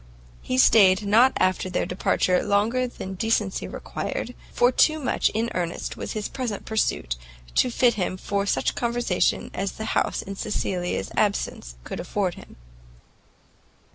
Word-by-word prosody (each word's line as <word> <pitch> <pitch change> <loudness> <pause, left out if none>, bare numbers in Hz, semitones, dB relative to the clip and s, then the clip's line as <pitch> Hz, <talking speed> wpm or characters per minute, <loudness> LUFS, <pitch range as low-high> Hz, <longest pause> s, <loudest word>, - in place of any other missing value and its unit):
He 125 - -2
stayed 190 - +6
not 230 +6 +5
after 185 0 +1
their 180 - -1
departure 180 0 +1
longer 220 +5 +1
than 190 -5 -7
decency 210 -1 0
required, 245 - -5 0.2
for 245 +1 +3
too 310 +4 +3
much 260 - +1
in 225 +2 -2
earnest 175 -1 -3
was - - -5
his 215 -1 -3
present 240 -6 -4
pursuit, 140 - -1 0.4
to - - +3
fit 245 0 +3
him 185 -3 -2
for 200 +1 -2
such - - +1
conversation 235 -5 0
as 195 +1 -2
the 220 - -6
house - - 0
in 195 - -7
Cecilia's 185 -3 -2
absence 200 - -1
could - - -6
afford - - -1
him. - - -13
205 Hz, 145 wpm, -25 LUFS, 185-235 Hz, 0.4 s, stayed